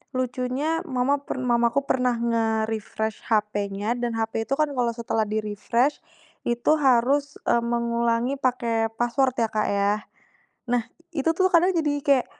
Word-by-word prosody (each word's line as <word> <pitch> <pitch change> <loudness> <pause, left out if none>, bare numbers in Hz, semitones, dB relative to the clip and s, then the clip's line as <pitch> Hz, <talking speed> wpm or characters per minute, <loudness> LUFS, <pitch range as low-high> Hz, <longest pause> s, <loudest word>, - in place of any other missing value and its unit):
lucunya 255 +5 -1
mama 275 +1 +1
per - - -5
mamaku 240 0 +2
pernah 250 -2 +1
nge-refresh 220 -2 -1
hp-nya, 210 0 0
dan 240 -1 -2
hp 225 0 -2
itu 265 - -2
kan 305 - +4
kalau 240 -2 +1
setelah 225 -1 -1
di-refresh, 215 +6 0 0.5
itu 240 +3 +1
harus, 275 +2 +3
e - - +4
mengulangi 235 +1 0
pakai 235 -4 +1
password 255 +2 +1
ya 230 - +2
Kak 215 -1 0
ya. 200 0 +2 0.8
Nah 245 -1 +3 0.3
itu 280 +2 0
tuh 375 0 +4
kadang 355 +2 +5
jadi 315 -4 +1
kayak 275 -3 +3
240 Hz, 140 wpm, -25 LUFS, 225-265 Hz, 0.8 s, kadang